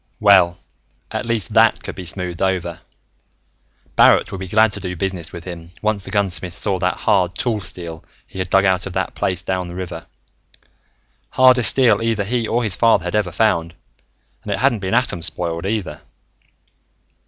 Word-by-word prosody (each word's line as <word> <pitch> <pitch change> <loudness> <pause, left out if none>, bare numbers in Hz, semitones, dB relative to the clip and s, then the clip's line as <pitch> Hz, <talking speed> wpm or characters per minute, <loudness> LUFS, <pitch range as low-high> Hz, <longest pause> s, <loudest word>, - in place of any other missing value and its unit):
Well, 95 -4 +5 0.5
at - - -3
least 115 -6 -2
that - - +4
could - - -6
be 95 - -8
smoothed 90 0 -5
over. 90 -3 -1 1.2
Barrett - - +5
would 95 - -5
be 95 - -6
glad 110 +3 +4
to 100 - -4
do 90 -2 -5
business 90 -2 -4
with 85 - -9
him, 85 -2 -8
once 105 -2 0
the - - -9
gunsmith 95 -3 -1
saw 95 +2 -1
that 90 +1 0
hard 90 -4 +1
tool 115 -4 -1
steel 85 -4 -8 0.2
he 95 - -10
had 95 -1 -2
dug 95 +1 +4
out 95 0 +1
of 95 - -8
that 95 +1 -2
place 90 -3 -2
down 90 -1 -2
the 85 - -8
river. 90 -1 -6 1.2
Hardest 130 -4 +5
steel 115 -6 +3
either 115 -3 0
he 115 +2 -1
or 120 +1 0
his 105 -6 -1
father 110 -1 +3
had 90 - -3
ever 105 -4 0
found, 85 -4 +1 0.7
and - - -6
it - - 0
hadn't 115 - +2
been 95 +2 -1
atom 115 -8 0
spoiled, 85 +1 -2
either. 105 -2 -3
95 Hz, 180 wpm, -20 LUFS, 90-105 Hz, 1.2 s, Well